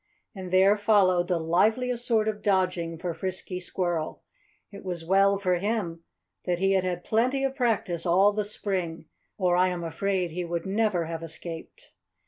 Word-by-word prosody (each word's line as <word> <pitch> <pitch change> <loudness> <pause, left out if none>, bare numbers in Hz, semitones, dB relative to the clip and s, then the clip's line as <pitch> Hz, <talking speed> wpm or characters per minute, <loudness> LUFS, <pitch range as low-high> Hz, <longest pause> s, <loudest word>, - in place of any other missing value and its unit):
And 190 -4 -7
there 190 +3 +5
followed 195 -4 +3
the 180 -2 +1
liveliest 220 +9 +1
sort 220 -2 +2
of 210 -1 -2
dodging 185 -4 0
for 170 +1 -3
Frisky 185 0 -4
Squirrel. 175 -3 -3 0.5
It 200 - -10
was 175 -3 -5
well 195 +2 +4
for 180 -3 0
him 190 -5 -2 0.4
that 180 -1 0
he 195 +2 +2
had 190 -1 +2
had 180 -1 -3
plenty 255 +5 +1
of 270 -1 0
practice 225 - 0
all 190 +4 +4
the 210 0 -1
spring, 185 -5 -3 0.3
or 180 -3 +2
I 180 +1 +4
am 180 -2 -3
afraid 185 +1 -1
he 180 +2 -3
would 170 +1 -3
never 195 -3 +1
have 165 0 -5
escaped. 165 - -8
185 Hz, 170 wpm, -27 LUFS, 175-205 Hz, 0.5 s, there